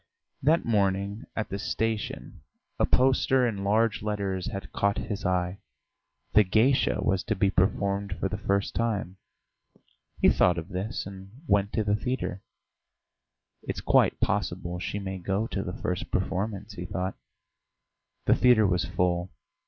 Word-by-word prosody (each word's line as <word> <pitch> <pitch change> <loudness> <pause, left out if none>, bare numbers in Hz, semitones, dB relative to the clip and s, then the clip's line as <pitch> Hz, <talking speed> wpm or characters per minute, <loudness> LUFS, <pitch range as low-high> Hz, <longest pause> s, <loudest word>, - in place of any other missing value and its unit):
That 155 +5 +3
morning 100 0 0
at 110 - -2
the 100 - -4
station 110 +2 -3 0.4
a - - +3
poster 130 0 +3
in 100 -5 -2
large 110 +2 +2
letters 100 -3 -2
had 100 - -5
caught 100 0 +1
his 105 -1 -4
eye. 90 +1 0 0.7
"The 105 - +8
Geisha" 115 +8 +2
was 95 -1 +1
to 110 - 0
be 95 0 +2
performed 100 +1 +1
for 95 - 0
the 100 +1 -4
first 100 -1 0
time. 105 -5 -1 1.0
He - - +5
thought 90 -1 +3
of 85 +2 -5
this 100 +5 -3
and 95 0 -9 0.2
went 100 -4 +2
to 110 - +1
the 105 0 +2
theatre. 115 -5 -3 1.2
"It's - - -4
quite - - +3
possible 90 0 -1
she 95 +3 -3
may 95 -2 -4
go 95 +4 -1
to 100 - -3
the 90 -2 -5
first 90 -1 -2
performance," 100 +3 -2
he 90 -3 -6
thought. 95 +1 -2 1.1
The - - +5
theatre 120 -4 +5
was 90 -2 +1
full. 90 0 0
100 Hz, 150 wpm, -27 LUFS, 95-110 Hz, 1.2 s, The